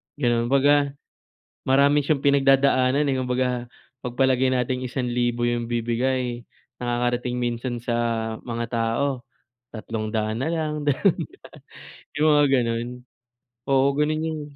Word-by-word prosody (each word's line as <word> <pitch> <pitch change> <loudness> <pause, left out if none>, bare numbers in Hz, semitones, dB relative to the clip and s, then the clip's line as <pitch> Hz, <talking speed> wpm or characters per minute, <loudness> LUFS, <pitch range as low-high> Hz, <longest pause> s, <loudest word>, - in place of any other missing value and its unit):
ganun. 120 -4 +1
Kumbaga, 140 +1 +3 0.7
marami 140 +2 +3
siyang 145 -1 0
pinagdadaanan, 135 0 +3
eh. 135 - +1
Kumbaga, 125 0 0 0.5
pagpalagay 130 +1 +1
nating 125 +1 -1
1000 120 -1 -1
yung 120 0 -1
bibigay, 120 +1 -1 0.4
nakakarating 120 0 -1
minsan 120 0 -3
sa 120 0 -2 0.5
mga 115 -1 -3
tao 120 +3 -1 0.5
300 110 -1 -3
na - - -1
lang, 150 -2 -2
200, 155 +6 -3
yung 150 - +2
mga 145 - +5
gano'n. 120 -2 +1 0.9
Oo, 135 0 +4
ganun 155 +1 +1
yun. 160 -1 -3
125 Hz, 110 wpm, -24 LUFS, 120-140 Hz, 0.9 s, mga